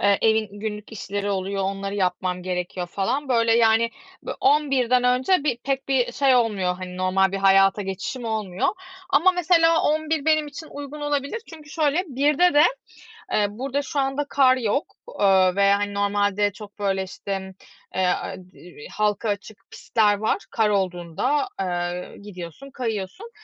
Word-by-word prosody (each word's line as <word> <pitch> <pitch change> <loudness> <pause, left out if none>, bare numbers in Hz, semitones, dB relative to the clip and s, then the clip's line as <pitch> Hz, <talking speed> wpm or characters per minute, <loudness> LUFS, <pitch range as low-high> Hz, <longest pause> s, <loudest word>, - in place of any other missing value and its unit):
eee, 200 -1 +3
evin 220 -1 +3
günlük 210 0 -5
işleri 205 -1 -4
oluyor, 195 0 -2
onları 195 +1 -3
yapmam 180 -1 -1
gerekiyor 180 0 -3
falan 250 +11 -2
böyle 230 -2 +3
yani, 230 0 +4 0.3
bö - - -4
11'den 265 -4 +3
önce 260 +7 +2
bi 245 -6 0
pek 270 0 -2
bir 260 -3 +1
şey 270 -2 +3
olmuyor 205 -7 +1
hani, 180 0 -8
normal 185 +1 +2
bir - - -1
hayata 195 +1 +4
geçişim 195 +6 -5
olmuyor 215 -5 -1 0.4
ama 345 +6 +5
mesela 330 -2 +3
11 310 -1 0
benim 310 -1 +3
için 315 +2 -9
uygun 285 +1 -8
olabilir. 290 +7 -2
Çünkü 305 -3 -12
şöyle, 315 +2 +1
1'de 290 +5 +2
de, 295 - +7 0.7
eee, 210 - +3
burada 265 +6 -3
şu 280 +1 -2
anda 270 +2 -1
kar 260 -2 +4
yok, 250 +4 -1 0.3
eee, 190 -2 +5
ve 200 0 +4
hani, 205 0 0
normalde 205 0 +1
çok 210 +1 -12
böyle 195 -1 0
işte, 195 +1 -5
m 190 0 -9 0.4
eee, 185 -1 +1
a 180 - -1
i 185 - -11 0.3
vi 145 - -10
halka 210 +1 0
açık 205 +1 -4
pistler 210 -2 +1
var 220 - 0
kar 220 -2 +2
olduğunda, 190 - -1
eee, 175 -1 -2 0.2
gidiyorsun, 195 - -9
kayıyorsun. 235 - -5
215 Hz, 160 wpm, -23 LUFS, 195-275 Hz, 0.7 s, de